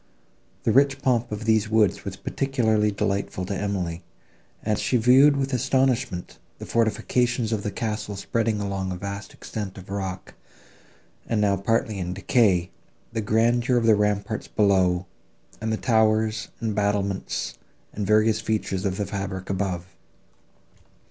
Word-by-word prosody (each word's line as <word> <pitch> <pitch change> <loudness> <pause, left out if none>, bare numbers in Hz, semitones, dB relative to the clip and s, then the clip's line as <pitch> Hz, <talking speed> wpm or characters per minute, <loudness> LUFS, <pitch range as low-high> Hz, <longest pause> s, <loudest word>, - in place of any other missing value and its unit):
The - - +2
rich 140 0 +4
pomp 120 -3 +1
of 105 +1 -4
these 110 -1 +2
woods 110 -3 +2
was - - -4
particularly 110 -6 +1
delightful 100 -2 -2
to 100 +2 -3
Emily; 90 -4 -2 0.6
and 105 -1 0
she 125 - +1
viewed 130 +5 +6
with 135 0 -1
astonishment 130 -6 0 0.2
the - - -8
fortifications 115 +1 +1
of 105 - -1
the 105 - -2
castle 105 -1 -3
spreading 110 +2 -1
along 100 -2 -2
a - - -3
vast 100 +2 -6
extent 105 -3 -6
of 95 0 -10
rock, 95 -2 -4 0.9
and 115 - 0
now 100 -1 +3
partly 110 +1 0
in 90 0 -3
decay, 95 -3 +2 0.4
the 115 - -1
grandeur 120 +4 +2
of 115 - +1
the 115 - +6
ramparts 105 +1 0
below, 95 -3 +2 0.6
and 110 0 -1
the 110 - 0
towers 110 -1 +2
and 110 -2 -1
battlements 100 -1 -1 0.3
and 100 -2 -3
various 110 0 +3
features 105 -3 -2
of 95 -1 -1
the 105 - -1
fabric 95 -1 -4
above. 95 -3 -2
105 Hz, 145 wpm, -25 LUFS, 100-115 Hz, 0.9 s, viewed